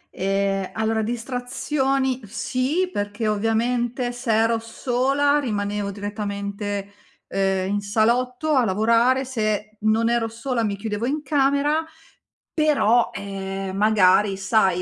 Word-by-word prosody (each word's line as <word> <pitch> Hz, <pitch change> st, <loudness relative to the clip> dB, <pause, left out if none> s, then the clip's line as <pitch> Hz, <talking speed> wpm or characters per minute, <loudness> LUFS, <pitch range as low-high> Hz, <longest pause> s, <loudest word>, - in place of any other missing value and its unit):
Ehm, 195 Hz, 0 st, 0 dB
allora 220 Hz, 0 st, 0 dB
distrazioni 260 Hz, +3 st, -1 dB
sì, 260 Hz, -, -1 dB
perché 205 Hz, +2 st, -2 dB
ovviamente 235 Hz, +3 st, 0 dB
se 245 Hz, -1 st, -3 dB
ero 225 Hz, +1 st, +3 dB
sola 265 Hz, +5 st, +1 dB
rimanevo 205 Hz, -5 st, -2 dB
direttamente, 200 Hz, 0 st, -4 dB, 0.4 s
ehm, 195 Hz, 0 st, 0 dB
in 205 Hz, -, 0 dB
salotto 245 Hz, +8 st, +1 dB
a 260 Hz, -3 st, +4 dB
lavorare, 230 Hz, +6 st, +3 dB
se 215 Hz, -3 st, -2 dB
non 220 Hz, +2 st, +2 dB
ero 235 Hz, -1 st, +1 dB
sola 230 Hz, +1 st, -2 dB
mi 205 Hz, -2 st, -1 dB
chiudevo 210 Hz, +2 st, -3 dB
in 295 Hz, +3 st, -2 dB
camera, 290 Hz, +1 st, +2 dB, 0.7 s
però, 280 Hz, -7 st, +3 dB
ehm, 195 Hz, -1 st, -5 dB
magari 200 Hz, -1 st, +4 dB
sai, 190 Hz, -2 st, +2 dB
225 Hz, 115 wpm, -23 LUFS, 205-250 Hz, 0.7 s, a